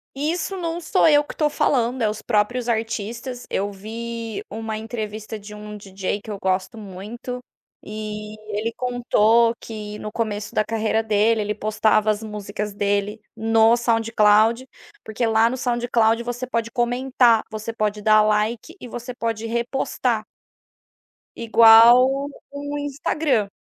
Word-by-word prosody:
Isso 330 +6 -2
não 340 -1 -3
sou 320 - +3
eu 295 -1 +5
que - - -9
estou 300 -1 +1
falando, 250 -3 0
é 215 - +2
os 215 +1 -5
próprios 240 +2 0
artistas. 235 +2 -3
Eu 200 +1 -1
vi 225 +2 -6
uma 220 0 -5
entrevista 215 -1 -6
de 210 +1 -11
um 210 0 -8
DJ 195 0 -4
que - - -12
eu 205 - -4
gosto 190 +4 -1
muito 215 +5 -7 0.4
e 210 0 -7 0.2
ele 230 +1 -2
contou 235 -2 +2
que 210 -2 -8
no 210 - -6
começo 210 -2 -3
da 215 - +1
carreira 220 0 0
dele, 220 +1 +2
ele 210 0 -2
postava 215 0 +1
as 215 +1 -3
músicas 210 -1 -5
dele 205 +1 -1 0.2
no 225 +1 +4
SoundCloud, 225 +1 +3 0.4
porque 220 +2 -2
lá 225 +1 +3
no 255 - -3
SoundCloud 240 -2 +1
você 245 +1 -4
pode 230 -2 -2
comentar, 245 -1 +2
você 215 +1 -5
pode 210 -1 -2
dar 215 0 +5
like 215 - 0
e 245 - -7
você 240 +2 -6
pode 225 -1 -3
repostar. 235 -1 -1 1.1
Igual 235 +4 +6 0.3
no 285 +1 -5
Instagram. 285 -5 -1
225 Hz, 140 wpm, -22 LUFS, 210-240 Hz, 1.1 s, Igual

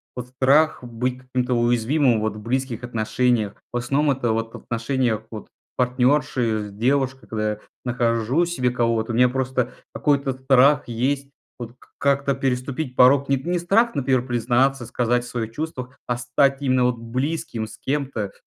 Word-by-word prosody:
вот 125 -1 -6
страх 135 +4 +2
быть 125 +1 -3
каким-то 125 -1 -1
уязвимым 120 +1 +2
вот 110 -1 -2
в - - -8
близких 125 +1 -2
отношениях. 115 -2 0 0.2
В 120 - -2
основном 140 +4 +1
это 120 -3 -1
вот 115 0 -2
в - - -7
отношениях 115 -1 -1
вот 110 -2 -8 0.3
партнёрши, 125 -4 +1
с - - -13
девушкой. 130 +2 0
Когда 110 -1 -1
я 105 - -6 0.2
нахожу 120 +5 +1
себе 130 -8 0
кого-то, 115 -2 0
у 115 - -2
меня 125 +1 +5
просто 130 -1 -1 0.2
какой-то 140 -2 +1
страх 135 +2 +4
есть 135 +4 -1 0.3
вот 120 -1 -8 0.2
как-то 140 -1 +1
переступить 130 +1 -2
порог. 135 +2 +5
Не 140 - +3
т 145 +7 -6
не 180 - +1
страх, 200 +7 +2
например, 130 -2 +1
признаться, 120 +2 +1
сказать 120 +1 0
о - - -9
своих 115 -2 -4
чувствах, 130 -4 -6
а 125 - -1
стать 135 +3 +1
именно 130 -2 +2
вот 125 -1 +1
близким 125 0 -3
с 110 - -12
кем-то, 135 -8 -3
125 Hz, 165 wpm, -23 LUFS, 120-135 Hz, 0.3 s, меня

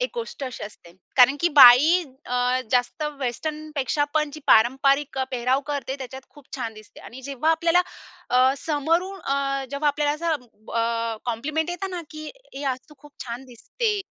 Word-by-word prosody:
एक - - -1
गोष्ट 460 -11 -6
अशी 255 - -7
असते. 175 -4 -13 0.2
कारण 265 +3 +6
की 345 - +3
बाई 285 +7 +8 0.2
अ, 250 +1 +1
जास्त 250 +5 0 0.2
वेस्टर्नपेक्षा 295 +2 -2
पण 305 -1 +1
जी 310 - -9
पारंपरिक 270 +4 +3
अ, 265 - +1
पेहराव 255 +1 +1
करते, 275 -2 -3
त्याच्यात 265 0 -8
खूप 290 - -17
छान 235 -4 -4
दिसते 215 0 -15
आणि 260 +3 -11
जेव्हा 280 +4 0
आपल्याला 335 +2 +3 0.5
अ, 255 +1 +4
समोरून 330 +7 -1
अ, 275 0 -1
जेव्हा 285 +1 0
आपल्याला 290 0 +1
असं 325 +1 -1 0.3
ब - - -11
अ, 230 0 0
कॉम्प्लिमेंट 300 +8 -2
येत 355 +2 -4
ना 360 -1 -4
की, 310 0 -8 0.3
"ए 275 - -7
आज 255 - -7
तू 300 - -16
खूप 295 +1 -17
छान 240 +1 -6
दिसते." 410 - -3
275 Hz, 175 wpm, -24 LUFS, 250-310 Hz, 0.5 s, बाई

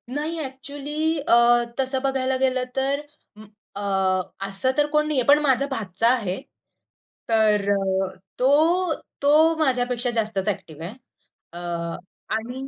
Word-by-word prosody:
नाही. 315 +3 -2
एक्चुअली 290 +4 -3
अ, - - +1 0.5
तसं 265 0 0
बघायला 265 -1 0
गेलं, 260 -1 +1
तर 275 +2 0 0.3
म 215 +1 -13 0.3
अ, 205 - -5 0.7
असं 195 +7 0
तर 295 - +4
कोण 300 0 +2
नाहीये. 275 -5 +1
पण 290 +1 +7
माझा 275 -2 +2
भाचा 215 -2 -1
आहे. 195 -7 -2 0.9
तर, 210 -3 +3 0.7
तो 320 +7 +3 0.3
तो 310 +3 +5
माझ्यापेक्षा 250 -4 +1
जास्तच 210 -3 -1
एक्टिव्ह 160 -5 -6
आहे. 195 - -7 0.6
अ, 175 - -7 0.8
आणि 250 +4 -5
265 Hz, 125 wpm, -23 LUFS, 225-290 Hz, 0.9 s, पण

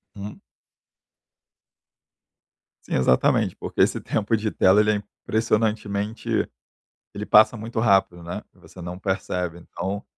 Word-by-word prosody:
Hum. 100 +1 -8 2.4
Sim, - - -6
exatamente, 65 -1 +2
porque - - -3
esse - - +3
tempo 110 +1 0
de 110 0 -1
tela 95 +3 +4
ele 105 0 +4
é - - +1 0.3
impressionantemente 110 -1 0 0.6
ele 105 +1 -5
passa 110 +3 +6
muito 115 +1 -4
rápido, 95 -5 +2
né, 85 - -5
você 90 - -15
não 90 +1 -6
percebe. 90 -3 -3
Então, 95 +3 -5
100 Hz, 120 wpm, -24 LUFS, 90-110 Hz, 2.4 s, passa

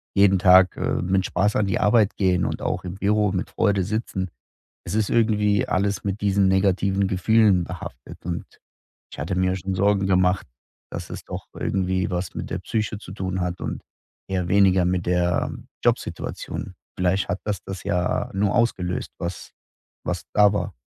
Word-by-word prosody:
jeden 100 -1 +5
Tag, 95 -1 +6
äh, - - -1
mit 95 +1 +1
Spaß 100 +5 +1
an 105 - +2
die 95 - 0
Arbeit 105 -1 +3
gehen 90 -3 +2
und - - -3
auch - - -2
im 90 +1 -6
Büro 105 0 +2
mit 95 -1 -3
Freude 100 -3 +2
sitzen. 100 -2 -3 0.6
Es - - -4
ist 110 -2 +1
irgendwie 105 -3 +2
alles 100 +1 0
mit 100 0 -2
diesen 100 -1 +2
negativen 95 0 +2
Gefühlen 100 0 +3
behaftet 90 0 -9
und 85 -1 -3 0.7
ich - - -10
hatte 85 +5 -2
mir 95 0 +1
schon 95 0 -3
Sorgen 100 0 +2
gemacht, 90 -2 +2 0.4
dass - - -6
es - - -7
doch - - -7
irgendwie 95 -1 -1
was 90 0 -3
mit - - -5
der - - -3
Psyche 110 -1 -2
zu 90 - -11
tun 95 -1 -3
hat 90 0 -3
und - - -4 0.5
eher 90 -2 -1
weniger 95 -2 +4
mit 90 -1 0
der 90 0 +1 0.3
Jobsituation. - - -2 0.2
Vielleicht 90 +1 +1
hat 90 - -2
das 105 -2 -2
das 95 -2 -7
ja 90 +1 -1
nur 100 0 +1
ausgelöst, 90 -7 0
was 85 +1 -5 0.5
was 90 -2 -2
da 105 -1 +5
war. 105 - -2
95 Hz, 175 wpm, -23 LUFS, 90-100 Hz, 0.7 s, Tag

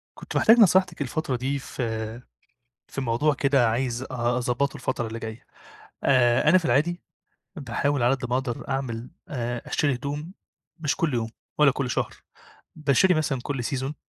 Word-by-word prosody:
كنت - - -8
محتاج 225 +2 +6
نصيحتِك 185 -5 +4
الفترة 135 0 -2
دي 135 +3 -2
في 110 -3 -4 0.7
في - - -5
موضوع 130 +4 +1
كده 135 -4 +3
عايز 120 +1 -1
أ - - -5 0.3
أضبّطه 125 +3 0
الفترة 120 -2 -2
اللي 115 +1 -5
جايّة. 110 0 -7 0.6
آآ 125 0 +4
أنا 185 +4 +7
في 175 - -7
العادي 170 +3 +1 0.5
باحاول 140 -2 -1
على 125 +3 +4
قد 130 -1 -6
ما 125 - +1
أقدر 130 -2 -3
أعمل 125 -3 -3 0.2
آآ 120 -3 -3
أشتري 145 -3 +1
هدوم 145 +6 -5 0.5
مش 150 -3 0
كل 160 -5 0
يوم 115 -2 -1 0.3
ولا 150 -2 +6
كل 135 -1 -3
شهر، - - -1 0.6
باشتري 155 +5 +3
مثلًا 150 -5 0
كل 135 -4 -3
سيزون 135 +3 -3
135 Hz, 160 wpm, -25 LUFS, 120-150 Hz, 0.7 s, أنا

